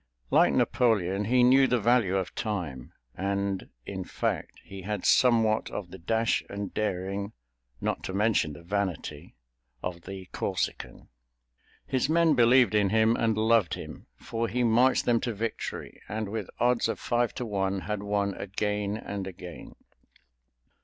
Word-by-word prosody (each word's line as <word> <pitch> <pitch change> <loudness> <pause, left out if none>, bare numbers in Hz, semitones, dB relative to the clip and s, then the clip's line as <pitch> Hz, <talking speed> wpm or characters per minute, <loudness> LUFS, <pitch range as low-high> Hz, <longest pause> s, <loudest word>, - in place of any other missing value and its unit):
Like - - +5
Napoleon, 105 -4 +2
he 125 +3 +4
knew 130 +2 +6
the 125 - +2
value 115 -4 +3
of 95 -2 -3
time, 85 - -4 0.2
and, 100 0 -2 0.2
in - - -5
fact, - - -3
he 95 0 -9
had 105 0 -4
somewhat 115 -3 +4
of 90 -4 -6
the 95 - -9
dash 110 +6 +1
and 100 -1 -5
daring, 100 0 -2 0.5
not - - -2
to - - -4
mention 105 -7 +2
the 85 - -12
vanity, 95 -5 -3 0.5
of 90 -1 -4
the 95 -1 -7
Corsican. - - -3 0.8
His 130 +2 0
men 165 -1 +4
believed 120 -3 +5
in 105 -2 +3
him 110 +2 +3
and 110 -2 +1
loved 110 -4 +3
him, - - -9
for 115 0 -3
he 125 +2 0
marched 120 +3 +4
them 120 -1 +3
to 120 -3 -2
victory, 115 +2 -5
and 110 -1 -3
with 105 -2 -4
odds 120 -1 +2
of - - -3
five 120 -1 0
to 125 - -3
one 95 -2 -1
had 105 0 -3
won 100 -1 0
again 105 +1 -2
and 100 -3 -5
again. 90 -2 -9
105 Hz, 155 wpm, -28 LUFS, 95-115 Hz, 0.8 s, knew